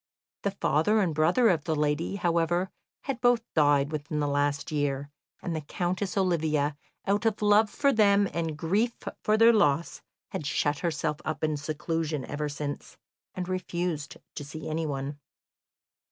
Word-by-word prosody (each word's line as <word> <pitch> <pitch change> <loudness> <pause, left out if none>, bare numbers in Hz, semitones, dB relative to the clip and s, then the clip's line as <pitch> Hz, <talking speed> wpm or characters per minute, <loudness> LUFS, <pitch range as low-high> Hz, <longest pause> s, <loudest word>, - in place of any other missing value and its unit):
The 200 - 0
father 195 +2 +2
and 180 -6 +1
brother 190 - +4
of 160 -5 +1
the 160 - 0
lady, 150 +5 0
however, 175 0 +1 0.3
had 265 -3 -3
both 245 -2 +4
died 145 -1 +3
within 150 0 -3
the 145 - +1
last 145 0 0
year, 145 -1 -1 0.3
and 170 - -2
the 160 - -2
Countess 180 +6 -2
Olivia 155 -6 +1 0.3
out 205 +2 +1
of 220 - 0
love 210 +1 +5
for 280 +6 +2
them 200 -2 +4
and 165 -2 -2
grief 205 +9 +1 0.3
for 215 +1 +2
their 230 +1 +7
loss 165 -7 +2 0.3
had 145 - -4
shut 145 -1 0
herself 155 -3 -1
up 155 -1 -4
in 155 -1 +1
seclusion 155 0 -2
ever 150 0 -3
since, 145 0 -5 0.4
and 180 -1 -3
refused 175 -4 -3 0.2
to - - -6
see 155 +2 -7
anyone. 145 -3 -3
160 Hz, 155 wpm, -28 LUFS, 145-190 Hz, 0.4 s, their